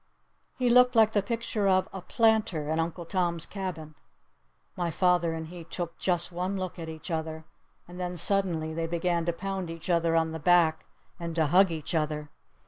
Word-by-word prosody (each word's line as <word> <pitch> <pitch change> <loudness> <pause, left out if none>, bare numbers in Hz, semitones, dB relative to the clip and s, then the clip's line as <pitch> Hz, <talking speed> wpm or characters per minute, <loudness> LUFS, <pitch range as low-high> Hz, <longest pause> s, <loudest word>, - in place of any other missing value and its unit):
He 250 -2 +2
looked 250 0 +6
like 220 -1 +6
the 205 - +2
picture 220 -1 -1
of 185 -1 +3
"a 190 - -6
planter" 205 -8 +1
in 160 - 0
"Uncle 170 +1 -2
Tom's 170 -2 -1
Cabin." 175 -6 -6 0.8
My 175 -1 -1
father 175 0 +2
and 160 0 -6
he 175 -1 -9
took 170 +1 -6
just 175 -1 0
one 180 +3 -2
look 185 -2 -5
at 165 -1 -6
each 160 +2 -8
other. 160 -1 -3 0.4
And 175 +1 -10
then 180 0 -3
suddenly 170 -4 0
they 165 0 -2
began 170 0 0
to - - +3
pound 190 0 -4
each 165 +2 -4
other 165 -1 +2
on 160 0 +2
the 160 - -5
back 165 -1 +3 0.3
and 170 -1 -5
to 160 -2 +3
hug 185 +5 +5
each 160 -1 -5
other. 150 -2 -1
170 Hz, 190 wpm, -28 LUFS, 160-190 Hz, 0.8 s, looked